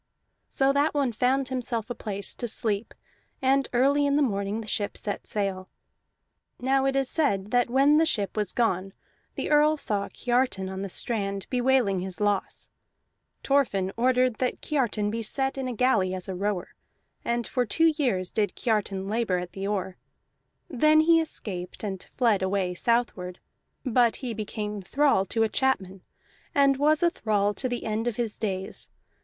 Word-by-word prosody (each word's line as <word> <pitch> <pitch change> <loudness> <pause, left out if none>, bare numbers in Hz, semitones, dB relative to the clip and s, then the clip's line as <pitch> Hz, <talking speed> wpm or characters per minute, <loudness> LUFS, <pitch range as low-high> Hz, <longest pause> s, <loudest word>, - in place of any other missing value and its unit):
So 270 0 +2
that 290 +2 +1
one 275 -4 +1
found 255 +4 +1
himself 245 -3 -3
a - - 0
place 200 -4 -5
to 240 - -4
sleep, 215 -1 -2 0.4
and 270 +1 +2
early 280 +4 +3
in 280 - +2
the 295 - +4
morning 200 -2 -1
the 215 - -10
ship 205 -1 -2
set 205 - -3
sail. 195 -3 -2 0.9
Now 265 +1 +2
it 270 - 0
is 270 -1 +1
said 210 - 0
that 245 -1 +2
when 275 +4 +4
the 325 - +4
ship 205 - -1
was 210 -3 0
gone 195 -5 0 0.4
the - - -3
Earl 300 +1 +4
saw 205 -7 -1
Kiartan 240 -6 0
on 190 0 -5
the 200 - -4
strand 200 -1 -2
bewailing 250 -6 +2
his 185 0 -5
loss. 205 -2 -1 0.8
Thorfinn 200 -9 +1
ordered 250 -1 +2
that 255 -1 -1
Kiartan 230 -8 -1
be 230 +1 -3
set 270 +5 +1
in 265 -1 -3
a 250 - -3
galley 205 -6 +2
as 185 - -7
rower, 190 0 -2 0.5
and 235 0 -1
for 250 - 0
two 325 +8 +3
years 225 - 0
did 205 -4 -1
Kiartan 200 -4 -1
labor 215 -3 0
at 180 0 -5
the 195 0 -4
oar. 190 -2 -2 0.7
Then 305 +4 +4
he 330 +1 +5
escaped, 185 - -5
and 195 -3 -4
fled 230 -6 +1
away 190 -1 0
southward; 185 -4 -1 0.5
but 240 -2 +3
he 250 -3 -5
became 210 -1 -4
thrall 265 -1 +2
to 225 - +1
a - - +3
chapman, 195 -7 -1 0.5
and 275 -1 +4
was 300 +3 +3
a 345 - +4
thrall 205 - 0
to 255 +4 -3
the 245 -1 -4
end 220 +2 -1
of 240 - -1
his 230 -3 -2
days. 190 -3 -4
225 Hz, 170 wpm, -26 LUFS, 195-265 Hz, 0.9 s, he